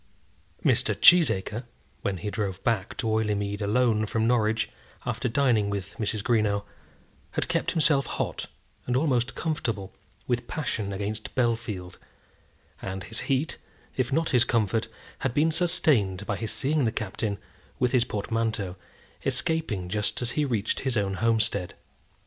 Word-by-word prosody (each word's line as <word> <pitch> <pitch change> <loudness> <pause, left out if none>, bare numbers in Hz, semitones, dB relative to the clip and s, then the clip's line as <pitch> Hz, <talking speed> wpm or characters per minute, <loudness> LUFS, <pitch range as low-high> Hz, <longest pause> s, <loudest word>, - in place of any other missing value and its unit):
Mr. - - +3
Cheesacre, 120 - +5 0.4
when 100 -2 -1
he 105 +4 -4
drove 100 -3 -3
back 110 -5 0
to 125 - -1
Oileymead 105 -2 0
alone 110 0 +2
from 110 +1 0
Norwich, 110 -2 +2 0.4
after 125 - -1
dining 115 -5 +2
with 100 -1 -4
Mrs. 105 -1 -1
Greenow, 105 -4 +2 0.7
had - - -1
kept - - 0
himself 150 -3 +3
hot, - - -3 0.4
and 125 0 +2
almost 130 -4 +1
comfortable, 115 - -2 0.3
with 120 -1 -1
passion 115 -9 -2
against 105 +2 -4
Bellfield; 115 -7 -1 0.8
and 95 0 -4
his 115 - -2
heat, 135 +4 0 0.4
if 130 -2 0
not 160 +4 +1
his 125 -4 +5
comfort, 115 -2 +1 0.3
had 135 -2 -2
been 155 +2 +4
sustained 120 - +2
by 100 - -1
his 110 +1 -3
seeing 145 0 +1
the 110 - +2
Captain, 105 -1 -2 0.4
with 125 - +1
his 125 -3 +4
portmanteau, 105 -4 -2 0.5
escaping 140 - +1
just 105 +3 -1
as 120 -1 0
he 150 +2 +1
reached 115 -6 0
his 130 -3 -1
own 100 -1 0
homestead. 110 -3 +1
110 Hz, 145 wpm, -27 LUFS, 100-125 Hz, 0.8 s, Cheesacre